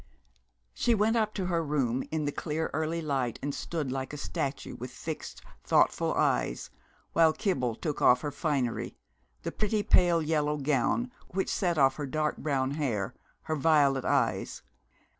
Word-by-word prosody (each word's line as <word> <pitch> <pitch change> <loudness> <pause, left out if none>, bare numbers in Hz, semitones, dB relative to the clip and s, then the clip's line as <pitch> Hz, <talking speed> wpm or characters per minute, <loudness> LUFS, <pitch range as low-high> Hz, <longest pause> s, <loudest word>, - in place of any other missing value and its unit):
She 240 -1 +2
went 215 +2 +2
up 215 -2 +2
to 190 - -1
her 170 -2 0
room 135 -5 0
in 155 -1 -1
the 145 - 0
clear 160 +2 -3
early 160 +2 -1
light, 135 -6 -1
and 145 0 -1
stood 150 -4 -3
like 130 +1 -4
a - - -5
statue, 140 -1 -3
with 125 +2 -6
fixed 155 +5 -7 0.2
thoughtful - - +2
eyes, 60 - 0 0.4
while 165 -1 +5
Kibble 130 - -1
took 150 +4 -4
off 125 0 +6
her 145 - -3
finery, 140 -6 -1 0.5
the - - -3
pretty 210 0 0
pale 175 -3 +4
yellow 150 -1 +1
gown 150 - +1 0.2
which 190 +1 -2
set 175 -4 0
off 135 -2 +4
her 145 -2 -3
dark 155 +2 -1
brown 135 -3 0
hair, 125 -10 -1 0.3
her 155 - -2
violet 145 -3 +3
eyes. - - 0
150 Hz, 160 wpm, -29 LUFS, 135-165 Hz, 0.5 s, off